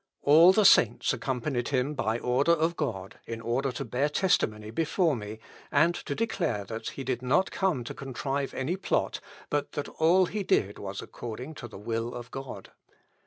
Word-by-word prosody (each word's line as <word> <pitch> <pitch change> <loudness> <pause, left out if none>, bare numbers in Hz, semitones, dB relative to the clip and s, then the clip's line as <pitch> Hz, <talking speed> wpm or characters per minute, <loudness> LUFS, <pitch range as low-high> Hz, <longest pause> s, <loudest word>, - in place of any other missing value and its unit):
All 160 +5 +8
the 210 +2 +3
saints 120 - +5
accompanied 125 -1 -2
him 135 +1 0
by 115 -5 -1
order 130 +7 +2
of 165 +1 +1
God, 110 -11 -4
in 115 -1 -5
order 125 +4 -1
to 135 +3 -4
bear 130 +5 0
testimony 110 - +1
before 165 - +1
me, 105 -1 -6 0.3
and 155 +4 +4
to - - -5
declare 165 - -1
that 110 +2 -5
he 135 - -7
did 130 -1 -2
not 140 +10 +2
come 180 -10 0
to 120 - -6
contrive 135 +1 -3
any 150 +8 -1
plot, 190 - -1 0.3
but 145 -1 -1
that 145 - -3
all 175 +4 +3
that - - -8
he 210 - -2
did 105 - +1
was 100 0 -5
according 120 +6 -7
to 120 - -8
the 110 - -11
will 115 +3 -3
of 120 0 -8
God. 135 -1 -8
135 Hz, 185 wpm, -28 LUFS, 115-160 Hz, 0.3 s, All